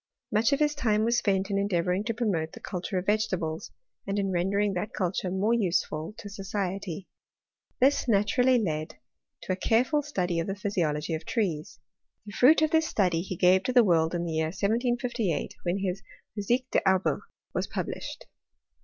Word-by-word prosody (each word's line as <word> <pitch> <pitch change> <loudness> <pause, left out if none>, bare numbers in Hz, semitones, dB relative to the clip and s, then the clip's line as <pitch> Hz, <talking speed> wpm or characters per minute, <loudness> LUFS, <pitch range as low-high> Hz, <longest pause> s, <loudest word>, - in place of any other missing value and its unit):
Much 220 +4 +3
of 280 - +3
his 300 -1 +2
time 220 -7 +1
was 235 +1 +2
sfient 195 0 0
in 200 - +1
endeavouring 180 -1 0
to 230 - -1
promote 200 -9 -1
the - - -9
culture 185 +1 -4
of 180 - -2
vegetables, 185 -6 -1 0.4
and 200 +1 -1
in 195 -1 0
rendering 195 +3 +1
that 180 +3 -3
culture 185 0 -1
more 195 +5 +1
useful 170 -4 0
to 205 - -8
society. 195 -2 -4 0.7
This 270 +1 +3
naturally 245 +4 +3
led 160 -7 -2 0.5
to - - -3
a - - +2
careful 245 +9 +2
study 180 - -1
of 165 - -2
the 195 - -2
physiology 170 -6 -1
of 160 +1 -3
trees. 180 -5 -2 0.5
The 205 - -8
fruit 300 +8 +5
of 310 - +2
this 320 -1 +3
study 180 -5 +1
he 185 +1 -5
gave 185 +2 +5
to 255 - 0
the 245 -1 +7
world 165 -3 +2
in 175 0 -1
the 165 - -3
year 160 0 +1
1758, 230 - -1
when 175 +2 -1
his 195 -1 -2 0.3
Physique 235 +5 0
des - - +3
Arbres 190 -1 +2 0.3
was - - -1
published. - - -5
195 Hz, 180 wpm, -28 LUFS, 175-225 Hz, 0.7 s, the